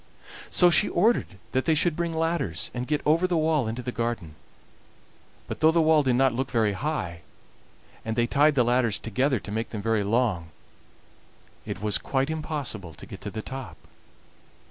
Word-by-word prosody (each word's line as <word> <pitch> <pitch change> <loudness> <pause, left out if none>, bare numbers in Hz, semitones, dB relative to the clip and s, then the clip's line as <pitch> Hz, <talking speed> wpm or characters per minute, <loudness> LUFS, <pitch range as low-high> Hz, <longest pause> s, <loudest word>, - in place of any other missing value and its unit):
So 175 -1 +5
she 205 - +4
ordered 220 - +1
that 130 0 0
they 160 - +3
should 165 +1 +2
bring 170 0 -1
ladders, 160 - -1
and 125 0 -4
get 150 -1 -1
over 165 +4 +3
the 175 -2 0
wall 155 -5 +1
into 115 +3 -4
the 125 - -3
garden; 115 -9 -3 1.1
but - - -6
though 160 - +5
the 165 +1 +3
wall 160 -1 +5
did 130 -3 +1
not 130 -1 +3
look 130 +2 -2
very 110 -4 +1
high, 95 - -3 0.8
and 110 0 -3
they 120 0 +2
tied 145 +4 +3
the 125 - +4
ladders 120 -3 +2
together 130 +4 0
to 100 - -9
make 110 +2 -2
them 105 -3 -6
very 110 -2 +1
long, 105 -6 0 1.2
it 95 - -5
was 105 -1 +2
quite 135 +2 -1
impossible 145 - -4
to - - -11
get - - -10
to - - -5
the 110 - -6
top. 135 -1 -7
130 Hz, 185 wpm, -26 LUFS, 110-155 Hz, 1.2 s, So